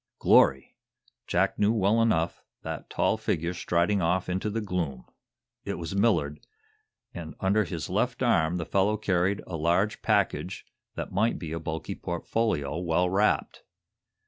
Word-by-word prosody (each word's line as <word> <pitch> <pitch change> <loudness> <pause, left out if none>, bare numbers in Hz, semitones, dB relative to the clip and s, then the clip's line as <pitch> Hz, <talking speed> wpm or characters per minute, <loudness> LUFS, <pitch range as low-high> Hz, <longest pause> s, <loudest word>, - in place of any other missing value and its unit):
Glory! 65 0 +4 0.5
Jack - - +1
knew, 105 +1 +4
well 110 +1 +2
enough, 85 -7 +1 0.2
that - - -6
tall - - +1
figure 85 +2 -1
striding 90 +3 +1
off 90 +2 0
into 95 +4 -1
the 110 +2 -2
gloom. 90 - -3 0.6
It - - -3
was 85 +3 -5
Millard, 85 -9 +1 0.7
and 80 -2 -7
under 100 +2 +2
his 85 -3 -5
left - - -1
arm 80 +2 +2
the 85 - -3
fellow 100 +4 +1
carried 95 -1 0
a 90 - -6
large 85 +6 +1
package - - 0 0.3
that - - -5
might 110 +5 +1
be 80 -3 -6
a 80 - -3
bulky 80 0 -4
portfolio 85 -4 -2
well 90 +1 +1
wrapped. 100 +3 +1
90 Hz, 145 wpm, -27 LUFS, 80-100 Hz, 0.7 s, Glory